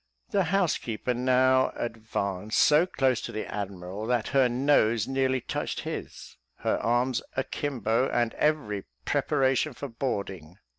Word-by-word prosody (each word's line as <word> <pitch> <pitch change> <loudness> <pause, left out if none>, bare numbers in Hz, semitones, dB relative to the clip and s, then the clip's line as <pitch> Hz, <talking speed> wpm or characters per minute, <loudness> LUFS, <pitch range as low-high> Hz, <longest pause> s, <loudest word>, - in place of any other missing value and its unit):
'" - - -39
The 195 -2 +2
housekeeper 160 - 0
now 130 +1 +3
advanced 110 -3 -3
so 155 +4 +5
close 130 -8 +1
to - - -5
the 110 - -4
admiral, 100 0 -5
that 120 -3 0
her 135 -2 +4
nose 120 -4 +2
nearly 130 -1 +1
touched - - -3
his, - - -7 0.2
her - - +1
arms 120 +2 +1 0.2
akimbo, 130 -2 0
and 120 -1 +1
every 135 -11 0 0.2
preparation 135 +2 +1
for 140 +3 -6
boarding. 100 - -4
125 Hz, 135 wpm, -27 LUFS, 110-135 Hz, 0.2 s, so